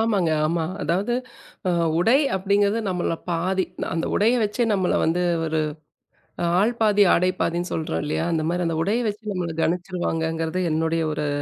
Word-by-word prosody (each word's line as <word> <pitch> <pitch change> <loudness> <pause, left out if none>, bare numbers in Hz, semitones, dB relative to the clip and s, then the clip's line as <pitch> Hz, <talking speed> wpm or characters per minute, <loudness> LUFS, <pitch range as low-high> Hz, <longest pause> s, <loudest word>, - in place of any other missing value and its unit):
ஆமாங்க, 200 -7 +2 0.2
ஆமா. 165 0 0 0.2
அதாவது 185 +10 0 0.5
அ - - +3 0.3
உடை 225 +9 +4 0.2
அப்படிங்கிறது 200 +3 +2
நம்மள்ள 180 -2 -1 0.2
பாதி. 185 +3 0 0.3
அந்த 165 0 -1
உடையை 230 +4 +3
வச்சே 210 +4 0
நம்மள 190 -3 +1
வந்து, 170 +2 +1 0.2
ஒரு 160 0 0 1.0
ஆள் 225 +4 +2
பாதி 210 -2 +4
ஆடை 180 +2 +3
பாதின்னு 175 +1 -1
சொல்றோம் 160 -1 -2
இல்லையா? 150 - -1
அந்த 155 -1 0
மாரி, 175 +1 -1
அந்த 165 -1 -1
உடையை 225 +6 0
வச்சு 210 0 -6
நம்மள 175 -2 -2
கணிச்சுருவாங்கங்கிறது 165 -1 -1
என்னுடைய 160 +1 0
ஒரு 150 0 -2
180 Hz, 150 wpm, -23 LUFS, 165-205 Hz, 1.0 s, உடை